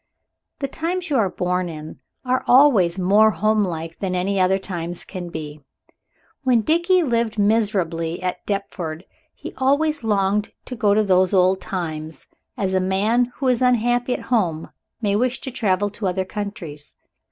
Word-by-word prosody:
The 275 Hz, -, -3 dB
times 345 Hz, +4 st, -3 dB
you 275 Hz, -, +3 dB
are 205 Hz, -5 st, +2 dB
born 180 Hz, 0 st, -1 dB
in 155 Hz, -1 st, -9 dB, 0.3 s
are 255 Hz, 0 st, +1 dB
always 235 Hz, -10 st, +5 dB
more 205 Hz, +4 st, +5 dB
home 215 Hz, 0 st, +1 dB
like 165 Hz, -3 st, -5 dB
than 185 Hz, -2 st, -2 dB
any 190 Hz, +2 st, 0 dB
other 185 Hz, +1 st, +3 dB
times 175 Hz, -3 st, -5 dB
can 180 Hz, -3 st, -7 dB
be. 150 Hz, -2 st, -7 dB, 0.8 s
When 250 Hz, -3 st, +3 dB
Dickie 345 Hz, -, +3 dB
lived 235 Hz, -5 st, 0 dB
miserably 195 Hz, -6 st, 0 dB
at 180 Hz, -, -3 dB
Deptford 185 Hz, -5 st, -4 dB, 0.3 s
he -, -, -9 dB
always 285 Hz, +2 st, +1 dB
longed 205 Hz, -1 st, 0 dB
to 250 Hz, -, -6 dB
go 205 Hz, -3 st, +2 dB
to 215 Hz, -, +3 dB
those 185 Hz, -1 st, +3 dB
old 185 Hz, +1 st, +3 dB
times, 160 Hz, -5 st, -5 dB, 0.3 s
as 190 Hz, -1 st, -1 dB
a 190 Hz, -, +3 dB
man 200 Hz, +6 st, +2 dB
who 270 Hz, -, -2 dB
is 250 Hz, -1 st, +2 dB
unhappy 245 Hz, 0 st, +2 dB
at -, -, -6 dB
home 170 Hz, -8 st, 0 dB, 0.3 s
may 200 Hz, -1 st, +2 dB
wish 250 Hz, +4 st, 0 dB
to 265 Hz, -, -5 dB
travel 205 Hz, -4 st, 0 dB
to 205 Hz, -1 st, -4 dB
other 185 Hz, +1 st, -1 dB
countries. 185 Hz, -8 st, -6 dB
200 Hz, 165 wpm, -22 LUFS, 180-240 Hz, 0.8 s, always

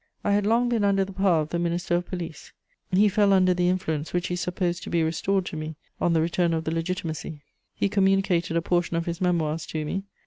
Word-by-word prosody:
I 205 Hz, -, +1 dB
had 205 Hz, 0 st, +2 dB
long 235 Hz, +2 st, +3 dB
been 235 Hz, -3 st, +1 dB
under 195 Hz, -1 st, +3 dB
the 195 Hz, -, -10 dB
power 185 Hz, -4 st, +3 dB
of 155 Hz, -, -4 dB
the 170 Hz, -, -2 dB
Minister 175 Hz, 0 st, -1 dB
of 175 Hz, 0 st, 0 dB
Police; 170 Hz, -4 st, -7 dB, 0.4 s
he 200 Hz, +3 st, +5 dB
fell 205 Hz, 0 st, +3 dB
under 185 Hz, -1 st, +5 dB
the 180 Hz, 0 st, +1 dB
influence 160 Hz, -5 st, -2 dB
which 175 Hz, +1 st, -1 dB
he 180 Hz, -, -1 dB
supposed 180 Hz, 0 st, -2 dB
to -, -, -7 dB
be 170 Hz, -1 st, +1 dB
restored 190 Hz, +4 st, 0 dB
to -, -, -6 dB
me 155 Hz, 0 st, -5 dB, 0.2 s
on 175 Hz, -, +2 dB
the 160 Hz, -, +3 dB
return 170 Hz, +1 st, +1 dB
of 160 Hz, -, -2 dB
the 160 Hz, -, -2 dB
Legitimacy: 165 Hz, -3 st, -4 dB, 0.3 s
he -, -, +1 dB
communicated 195 Hz, -4 st, +2 dB
a 165 Hz, -, 0 dB
portion 175 Hz, -1 st, 0 dB
of 165 Hz, -, -1 dB
his 170 Hz, 0 st, -4 dB
Memoirs 165 Hz, -3 st, 0 dB
to 155 Hz, -1 st, -3 dB
me. 190 Hz, +6 st, -2 dB
175 Hz, 235 wpm, -25 LUFS, 165-190 Hz, 0.4 s, he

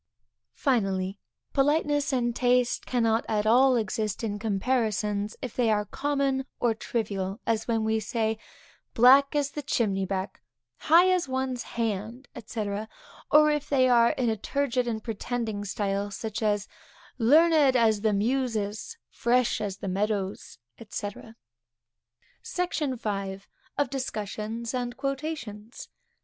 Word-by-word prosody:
Finally, 195 Hz, -6 st, 0 dB, 0.3 s
politeness 290 Hz, 0 st, +2 dB
and 240 Hz, -3 st, 0 dB
taste 250 Hz, -1 st, +1 dB
cannot 230 Hz, -2 st, +1 dB
at 210 Hz, -1 st, 0 dB
all 255 Hz, +4 st, +5 dB
exist 215 Hz, -1 st, -2 dB
in 205 Hz, -2 st, -2 dB
comparisons, 210 Hz, -1 st, -1 dB
if 250 Hz, -, -5 dB
they 240 Hz, -3 st, +2 dB
are 210 Hz, -1 st, +1 dB
common 275 Hz, +2 st, -1 dB
or 235 Hz, -2 st, +2 dB
trivial, 200 Hz, -3 st, -3 dB
as 225 Hz, -1 st, 0 dB
when 225 Hz, -2 st, +1 dB
we 220 Hz, 0 st, +1 dB
say, 220 Hz, 0 st, -1 dB, 0.6 s
black 270 Hz, +4 st, +6 dB
as 290 Hz, -1 st, +1 dB
the 295 Hz, -, -5 dB
chimney 200 Hz, -8 st, 0 dB
back, 190 Hz, 0 st, -4 dB, 0.4 s
high 340 Hz, +4 st, +5 dB
as 365 Hz, -5 st, +1 dB
one's 260 Hz, -1 st, -2 dB, 0.2 s
hand, 225 Hz, +3 st, -3 dB, 0.2 s
&c. 225 Hz, -, -4 dB, 0.7 s
or, 300 Hz, 0 st, +6 dB
if 295 Hz, -1 st, -2 dB
they 260 Hz, -2 st, +4 dB
are 235 Hz, -2 st, +5 dB
in 250 Hz, -, -1 dB
a 225 Hz, -, +1 dB
turgid 255 Hz, +2 st, -1 dB
and 220 Hz, -2 st, -3 dB
pretending 225 Hz, -2 st, -3 dB
style, 200 Hz, 0 st, -2 dB
such 215 Hz, +2 st, -5 dB
as, 205 Hz, -2 st, 0 dB, 0.5 s
learned 295 Hz, +2 st, +5 dB
as 220 Hz, -4 st, +3 dB
the 215 Hz, 0 st, +2 dB
Muses, 225 Hz, -, -1 dB
fresh 240 Hz, -1 st, +1 dB
as 200 Hz, -2 st, -3 dB
the 195 Hz, -, -6 dB
meadows, 200 Hz, 0 st, -2 dB, 0.2 s
&c. 210 Hz, -1 st, -5 dB, 1.3 s
SECTION 320 Hz, -7 st, -2 dB
V. 240 Hz, -, -15 dB, 0.7 s
_Of 285 Hz, -3 st, +1 dB
Discussions 225 Hz, -2 st, -4 dB
and 245 Hz, -1 st, -3 dB
Quotations. 270 Hz, -6 st, -5 dB
230 Hz, 130 wpm, -27 LUFS, 210-265 Hz, 1.3 s, black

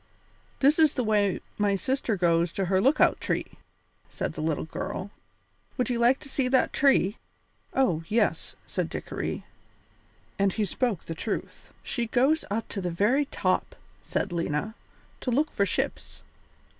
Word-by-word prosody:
"This 285 Hz, +4 st, +5 dB
is 310 Hz, -2 st, +5 dB
the 255 Hz, -, 0 dB
way 205 Hz, -3 st, +2 dB, 0.2 s
my 205 Hz, -1 st, +3 dB
sister 255 Hz, +1 st, 0 dB
goes 170 Hz, -2 st, +2 dB
to 195 Hz, -, -1 dB
her 190 Hz, +1 st, +2 dB
lookout 270 Hz, +7 st, +4 dB
tree," -, -, -1 dB, 0.6 s
said -, -, -3 dB
the -, -, -5 dB
little 155 Hz, -1 st, -1 dB
girl. 190 Hz, +4 st, -5 dB, 0.7 s
"Would 250 Hz, -2 st, 0 dB
you 235 Hz, -, 0 dB
like 240 Hz, +3 st, +5 dB
to 300 Hz, -, -10 dB
see 270 Hz, -1 st, 0 dB
that 260 Hz, 0 st, +2 dB
tree?" 255 Hz, -7 st, +3 dB, 0.6 s
"Oh, 185 Hz, -12 st, +2 dB
yes!" 225 Hz, +5 st, 0 dB
said -, -, -2 dB
Dickory, -, -, -4 dB, 0.9 s
and 195 Hz, -1 st, +3 dB
he 215 Hz, -, 0 dB
spoke 225 Hz, -4 st, -1 dB
the 165 Hz, -, -4 dB
truth. 205 Hz, +7 st, -5 dB
"She 240 Hz, -2 st, -2 dB
goes 270 Hz, +7 st, +3 dB
up 220 Hz, +3 st, -2 dB
to 200 Hz, -, -3 dB
the 180 Hz, -, -1 dB
very 210 Hz, +12 st, +2 dB
top," -, -, -1 dB, 0.3 s
said 180 Hz, -, -2 dB
Lena, 165 Hz, +4 st, -1 dB, 0.5 s
"to -, -, -3 dB
look 290 Hz, +6 st, +2 dB
for 200 Hz, -, +1 dB
ships. -, -, -3 dB
220 Hz, 155 wpm, -27 LUFS, 190-260 Hz, 0.9 s, This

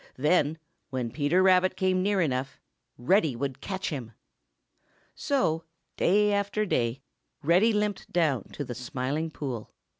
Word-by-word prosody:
Then, 150 Hz, +2 st, +2 dB, 0.3 s
when 125 Hz, -4 st, -3 dB
Peter 155 Hz, +7 st, +2 dB
Rabbit 185 Hz, 0 st, +4 dB
came 185 Hz, -1 st, +1 dB
near 200 Hz, 0 st, +2 dB
enough, 130 Hz, -3 st, -2 dB, 0.4 s
Reddy 155 Hz, -, +2 dB
would 135 Hz, +1 st, -4 dB
catch 190 Hz, -1 st, -3 dB
him. 120 Hz, -6 st, -5 dB, 1.0 s
So 165 Hz, -, 0 dB, 0.3 s
day 205 Hz, +3 st, +3 dB
after 205 Hz, +1 st, 0 dB
day 125 Hz, -, -1 dB, 0.4 s
Reddy 180 Hz, +9 st, +4 dB
limped 210 Hz, -1 st, -1 dB
down 150 Hz, -, +1 dB
to 145 Hz, -, -4 dB
the 120 Hz, -, -5 dB
Smiling 135 Hz, +5 st, -3 dB
Pool. 130 Hz, -8 st, -5 dB
160 Hz, 130 wpm, -28 LUFS, 130-190 Hz, 1.0 s, Rabbit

